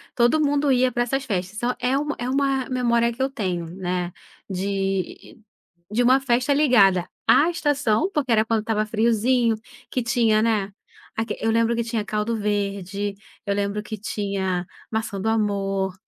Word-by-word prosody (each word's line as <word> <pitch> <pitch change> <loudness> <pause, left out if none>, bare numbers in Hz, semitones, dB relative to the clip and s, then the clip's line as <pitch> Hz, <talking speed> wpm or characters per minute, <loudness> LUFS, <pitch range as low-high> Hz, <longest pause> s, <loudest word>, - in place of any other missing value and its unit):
todo 240 +6 +3
mundo 290 -1 +2
ia 255 0 +3
pra 240 - +1
essas 270 +3 -2
festas 190 -2 -3
então 245 +2 -1
é 255 +2 +1
uma 295 +1 -2
é 245 +1 -3
uma 270 -1 0
memória 235 -2 +2
que 245 +3 -7
eu 265 - +2
tenho, 185 -9 -3
né, 180 -1 -3 0.4
de 195 0 -3 0.5
de 235 +3 +1
uma 260 +2 +5
festa 255 +2 +2
ligada 200 - +4 0.2
à 315 +4 +5
estação 290 - +1
porque 270 -5 0
era 220 -1 +4
quando 225 -1 +1
estava 215 -1 0
friozinho, 230 +1 +2 0.3
que 255 - 0
tinha, 230 -2 +2
né, 210 -3 +1 0.5
aquele 225 -1 -2
eu 225 - +2
lembro 230 +1 +2
que 235 - 0
tinha 225 -2 -2
caldo 210 +3 -1
verde, 200 -1 -2 0.3
eu 200 - 0
lembro 205 +1 -2
que 215 0 -6
tinha 195 -4 -2 0.2
maçã 220 -3 -3
do 220 - -2
amor, 195 -3 0
225 Hz, 170 wpm, -23 LUFS, 200-250 Hz, 0.5 s, uma